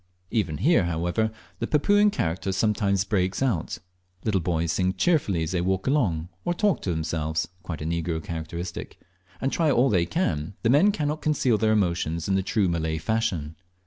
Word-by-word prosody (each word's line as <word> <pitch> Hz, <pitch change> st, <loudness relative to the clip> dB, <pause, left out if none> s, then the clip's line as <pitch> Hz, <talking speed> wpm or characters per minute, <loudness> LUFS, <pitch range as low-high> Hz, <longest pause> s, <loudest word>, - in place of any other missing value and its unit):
Even 90 Hz, -10 st, 0 dB
here, 145 Hz, -, +3 dB
however, 85 Hz, +6 st, 0 dB, 0.3 s
the -, -, -2 dB
Papuan 205 Hz, +7 st, +4 dB
character 85 Hz, -, -2 dB
sometimes 100 Hz, -1 st, +1 dB
breaks 95 Hz, -3 st, 0 dB
out. 105 Hz, -12 st, -1 dB, 0.5 s
Little 100 Hz, -4 st, +1 dB
boys 85 Hz, -1 st, 0 dB
sing 90 Hz, +2 st, 0 dB
cheerfully 100 Hz, -, +2 dB
as 80 Hz, -, -3 dB
they 90 Hz, -2 st, 0 dB
walk 95 Hz, +1 st, 0 dB
along, 95 Hz, -, +1 dB
or 175 Hz, -, -1 dB
talk 205 Hz, +1 st, +2 dB
aloud -, -, -23 dB
to -, -, -1 dB
themselves 80 Hz, -1 st, -1 dB
(quite 85 Hz, -5 st, -5 dB
a -, -, -5 dB
negro 80 Hz, -1 st, -2 dB
characteristic); 85 Hz, +2 st, -6 dB, 0.4 s
and 135 Hz, -, -1 dB
try 165 Hz, -2 st, +2 dB
all 130 Hz, -1 st, +3 dB
they 85 Hz, -4 st, +2 dB
can, 85 Hz, -, -1 dB
the 115 Hz, -, +4 dB
men 180 Hz, +10 st, +5 dB
cannot 150 Hz, -6 st, -2 dB
conceal 130 Hz, -7 st, +2 dB
their 110 Hz, 0 st, +3 dB
emotions 85 Hz, -5 st, 0 dB
in 100 Hz, -, +1 dB
the 95 Hz, -, +2 dB
true 100 Hz, +1 st, +1 dB
Malay 80 Hz, -2 st, -1 dB
fashion. 80 Hz, -4 st, -1 dB
95 Hz, 180 wpm, -25 LUFS, 85-115 Hz, 0.5 s, men